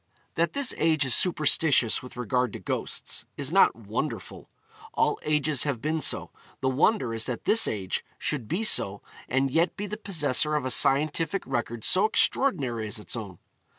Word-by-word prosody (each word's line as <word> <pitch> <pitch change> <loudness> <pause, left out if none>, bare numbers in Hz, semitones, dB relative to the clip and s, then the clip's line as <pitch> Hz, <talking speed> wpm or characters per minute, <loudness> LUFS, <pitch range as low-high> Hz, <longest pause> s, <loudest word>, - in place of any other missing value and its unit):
That 170 +1 0
this 280 -2 +1
age 155 -3 +2
is 130 - +2
superstitious 155 -7 +3
with 125 -1 -12
regard 125 0 -1
to - - -7
ghosts, - - -3
is - - -2
not - - +5
wonderful; - - -6 0.5
all - - +1
ages 150 -2 0
have 140 -5 -2
been 155 +4 -2
so; - - 0 0.3
the 130 - 0
wonder 130 - +1
is 115 -1 -1
that 125 -3 -5
this 225 +1 +4
age 95 -4 -3
should 130 -8 -3
be 185 - -2
so 100 - +3 0.3
and 135 +1 0
yet 165 +5 +1
be 205 - -4
the 210 +1 -6
possessor 150 -7 +1
of 145 -3 -1
a 130 - -2
scientific 150 +8 +1
record 120 -1 -4
so 190 +3 +3
extraordinary 135 - 0
as 105 - -3
its 105 - -4
own. 100 -6 -7
140 Hz, 175 wpm, -26 LUFS, 120-165 Hz, 0.5 s, not